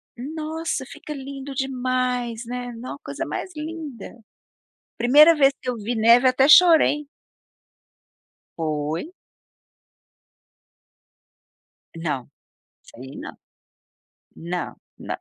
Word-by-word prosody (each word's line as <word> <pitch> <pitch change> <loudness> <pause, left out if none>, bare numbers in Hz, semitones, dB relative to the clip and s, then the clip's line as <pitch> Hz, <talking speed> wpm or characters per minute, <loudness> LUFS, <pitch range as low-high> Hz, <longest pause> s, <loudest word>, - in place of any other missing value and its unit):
Nossa 310 +2 -4
fica 300 - -11
lindo 275 0 -8
demais, 255 -3 -2
né, 245 +1 -5
nossa 245 +4 -8
coisa - - -5
mais 375 - -5
linda. 300 -8 -8 0.7
Primeira 295 +8 +7
vez 275 -2 +5
que 255 - -4
eu 250 - -1
vi 230 +2 -4
neve 235 +3 +5
até 265 +1 +3
chorei. 310 -2 +6 1.5
Foi. 155 - -3 2.8
Não, 150 -6 -3 0.6
sei 130 +3 -12
não. - - -7 1.0
Não, 175 +1 -5 0.2
não. - - -5
255 Hz, 90 wpm, -23 LUFS, 230-295 Hz, 2.8 s, Primeira